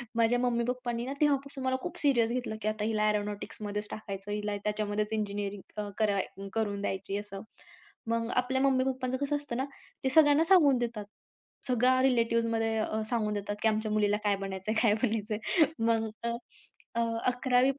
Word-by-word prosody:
माझ्या 230 +1 +3
मम्मी-पप्पांनी 240 0 -1
ना 270 - -3
तेव्हापासून 280 -2 +1
मला 260 0 +1
खूप - - -5
सीरियस 240 -6 +3
घेतलं 245 -3 -2
की 215 - -2
आता 215 0 -1
हिला 215 -1 +2
एरोनॉटिक्समध्येच 210 0 -3
टाकायचं. 200 -1 -6
हिला 210 0 -2
त्याच्यामध्येच 210 0 -1
इंजिनिअरिंग 205 -1 -3
कर 205 -2 +2 0.3
करून 205 -3 -1
द्यायची 195 0 -2
असं. 205 -1 -6 0.7
मग 230 0 0
आपल्या 255 +1 +1
मम्मी-पप्पांचं 260 -1 +1
कसं 285 +2 0
असतं 285 -5 -5
ना? 265 - 0 0.4
ते 265 - +2
सगळ्यांना 300 0 +7
सांगून 320 -7 +6
देतात. 235 -3 -3 0.6
सगळ्या 255 +1 +3
रिलेटिव्हजमध्ये 230 -3 +2
अ, 220 0 -1
सांगून 215 -3 0
देतात 205 0 -3
की - - +3
आमच्या 215 0 -1
मुलीला 210 -1 +2
काय 205 -1 +3
बनायचं 195 +1 -4
आहे? 220 - +1
काय 225 -4 +4
बनायचं 220 -2 0
आहे? 310 - +3 0.2
मग 225 -1 +2
अ, 235 - 0 0.7
अ, 235 - +2 0.3
11वी 250 +1 +3
पर्यंत - - -7
225 Hz, 165 wpm, -30 LUFS, 210-255 Hz, 0.7 s, सगळ्यांना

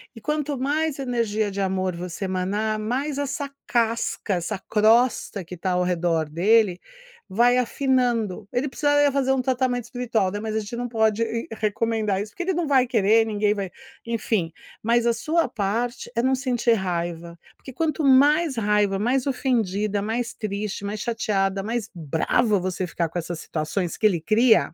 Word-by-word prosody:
E 225 - -11
quanto 300 +1 -2
mais 295 +3 0
energia 230 -5 -1
de 200 - -5
amor 185 -1 0
você 180 +2 -6
emanar, 205 +4 -1
mais 270 +6 -2
essa 285 0 -3 0.2
casca, 230 -4 0
essa 175 +4 -3
crosta 220 -2 +3
que 180 +1 -9
tá 185 +2 -2
ao 180 0 +1
redor 165 -3 0
dele, 190 +3 +3 0.5
vai 240 +5 +4
afinando, 240 -6 0
ele 260 +3 0
precisaria 290 0 +3
fazer 265 -1 +1
um 260 - +1
tratamento 250 -1 0
espiritual, 235 -6 -1
né, 205 - -4
mas 220 0 -4
a - - +2
gente 225 +3 -7
não 245 0 -2
pode 220 -1 +1 0.3
recomendar 215 -2 -1
isso 210 - -6
porque 360 - -5
ele 380 +1 0
não 345 -1 -1
vai 260 -3 +4
querer 225 -1 +4
ninguém 210 -1 +1
vai 195 -3 -4 0.4
enfim, 220 -6 -1 0.3
mas 235 +1 +2
a 235 - +4
sua 315 +8 0
parte 230 +4 -2
é 235 - +1
não 260 +1 +3
sentir 250 -3 0
raiva, 170 -3 -3 0.2
porque 265 - -11
quanto 315 +1 -1
mais 290 +3 +5
raiva, 210 -2 +2
mais 250 +6 0
ofendida, 215 -6 0
mais 230 +3 -2
triste, 205 -1 -4
mais 205 0 -4
chateada, 200 -5 0
mais 225 +1 -3
brava 180 - +1
você 185 0 -2
ficar 165 -1 -2
com 175 - -3
essas 170 0 -5
situações 160 +3 -3
que 220 - -1
ele 175 -6 +3
cria, 220 +5 +3
220 Hz, 170 wpm, -24 LUFS, 195-250 Hz, 0.5 s, mais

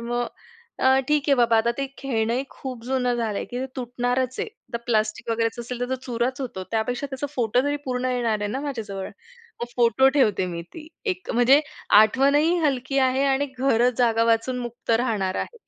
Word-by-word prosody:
मग 240 +1 -2 0.5
अ, - - +1 0.2
ठीक 300 -1 +3
आहे 280 - +6
बाबा 235 -2 +4
आता 225 +1 +3
ते 275 - -1
खेळणंही 240 -1 -1
खूप 255 -3 -8
जुनं 250 -1 0
झालंय, 225 -4 -2
की 245 - -6
ते 260 - -2
तुटणारच 250 +1 -1
आहे. - - -1
आता 265 - -8
प्लास्टिक 220 0 0
वगैरेचं 230 +1 -1
असेल 245 +1 -6
तर 245 - -1
तो - - +1
चुराच 245 +2 -1
होतो, 240 -8 -5
त्यापेक्षा 240 +5 -1
त्याचा 265 +1 -3
फोटो 245 -1 +2
जरी 290 +1 0
पूर्ण 255 -1 -2
येणार 235 -4 0
आहे 205 - -1
ना 265 - -3
माझ्याजवळ. 215 -9 -4 0.5
मग 240 - -2
फोटो 240 +3 +4
ठेवते 215 -8 +3
मी 170 -1 -5
ती 315 -2 -9 0.2
एक. 370 -4 -3
म्हणजे 250 +4 +5 0.4
आठवणही 280 +9 +3
हलकी 270 -1 0
आहे 260 +1 +2
आणि 275 +1 +2
घर 250 -2 +3
जागा 230 -2 +3
वाचून 250 +3 -1
मुक्त 240 -1 -6
राहणार 220 -5 +1
आहे. 470 -2 -19
245 Hz, 190 wpm, -24 LUFS, 230-265 Hz, 0.5 s, आहे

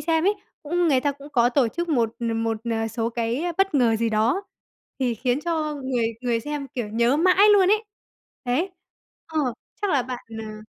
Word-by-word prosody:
xem 325 +2 +1
ấy, 410 +2 +3 0.3
cũng 345 +3 +1
người 265 -3 +4
ta 285 +1 0
cũng 285 +1 -13
có 240 -2 +4
tổ 255 -2 +2
chức 345 +7 -4
một 235 -6 +1
n 230 - 0
một, 225 -1 0
ờ, 225 0 0
số 225 0 -2
cái 235 +5 -1 0.2
bất 390 -4 +2
ngờ 235 -4 +4
gì 230 +1 0
đó 225 - +1 0.6
thì 250 -3 0
khiến 250 +4 0
cho 315 -3 -1
người 260 -4 -1
người 240 -2 0
xem, 295 +1 -4
kiểu, 235 -5 -3
nhớ 235 +5 +2
mãi 370 +5 +5
luôn 380 -2 +5
ấy. 430 +1 +3 0.6
Đấy, 295 +10 0 0.6
ờ, 320 -1 -3 0.4
chắc 405 - +1
là 275 -4 +3
bạn 250 -1 -5
nà 215 -1 -7
260 Hz, 200 wpm, -24 LUFS, 230-320 Hz, 0.6 s, mãi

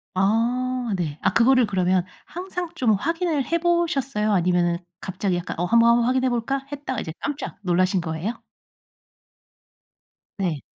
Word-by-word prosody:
아 240 +4 +1
네. 155 -4 -3
아 - - +1
그거를 255 0 +4
그러면 185 -2 +1 0.2
항상 360 0 -5
좀 240 -8 +2
확인을 325 - 0
해 335 - 0
보셨어요? 275 -10 +1
아니면은 175 -2 +2 0.2
갑자기 190 0 -2
약간 175 - -5
'어 175 - +1
한번, 235 +4 +5
한번 235 0 +4
확인해 255 +1 +2
볼까?' 260 +3 -2
했다가 275 -4 -4
이제 160 - -6
깜짝 290 0 -4
놀라신 185 0 +2
거예요? 170 +8 -4 2.0
네. 170 -7 -1
230 Hz, 295 characters per minute, -23 LUFS, 185-270 Hz, 2.0 s, 한번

